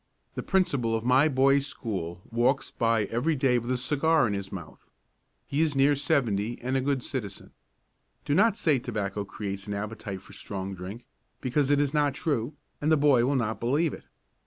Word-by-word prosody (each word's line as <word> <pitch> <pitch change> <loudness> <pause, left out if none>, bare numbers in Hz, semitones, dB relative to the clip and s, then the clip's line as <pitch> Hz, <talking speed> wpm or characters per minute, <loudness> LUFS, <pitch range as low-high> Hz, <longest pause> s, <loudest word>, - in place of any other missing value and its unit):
The - - -4
principal 140 - +1
of 110 - -2
my 130 +4 +5
boy's 140 0 +3
school 90 -9 -5
walks 125 +4 +1
by 115 -2 +1
every 120 +10 0
day 130 -3 +2
with 120 +1 -7
a 130 - +1
cigar 150 +3 +2
in 105 - 0
his 100 -1 -4
mouth. 85 -5 -9 0.6
He 140 +3 -1
is 155 -3 +1
near 140 +2 +4
seventy 120 -6 0
and 130 +2 -2
a 135 - +2
good 135 -1 0
citizen. 105 -8 -5 0.7
Do 145 - 0
not 210 +5 +4
say 150 - +2
tobacco 105 -4 -3
creates 100 -1 -5
an 105 - -3
appetite 100 -2 -5
for - - -15
strong 95 -1 -5
drink, 95 +6 -8 0.3
because 135 +2 0
it 145 -1 +4
is 145 0 +1
not 145 -2 +2
true, 145 -4 -1 0.3
and 150 +2 +1
the 160 - +5
boy 140 -4 +4
will 140 - +1
not 110 -4 -1
believe 145 +6 +1
it. - - -10
125 Hz, 190 wpm, -27 LUFS, 105-145 Hz, 0.7 s, my